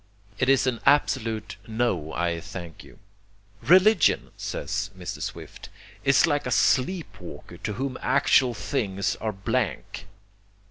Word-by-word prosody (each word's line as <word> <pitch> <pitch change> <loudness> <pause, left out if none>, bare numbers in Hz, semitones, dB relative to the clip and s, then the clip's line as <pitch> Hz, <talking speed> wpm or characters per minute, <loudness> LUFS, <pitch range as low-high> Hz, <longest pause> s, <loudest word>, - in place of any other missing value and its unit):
It 125 - +2
is 135 -1 +4
an 125 -3 -1
absolute 115 -6 +1
'No, 110 -9 -1
I 85 0 -1
thank 85 -2 -9
you.' - - -16 0.6
"Religion," 185 +1 +4
says - - -3
Mr. 90 -1 -6
Swift, - - -7 0.3
"is 140 +3 +5
like 145 -3 0
a - - -3
sleep 160 +6 +1
walker 85 - -10
to 105 - -4
whom 130 +4 -4
actual 130 -2 +3
things 100 -7 -2
are 110 0 -3
blank." 95 -2 -3
120 Hz, 130 wpm, -25 LUFS, 100-140 Hz, 0.6 s, is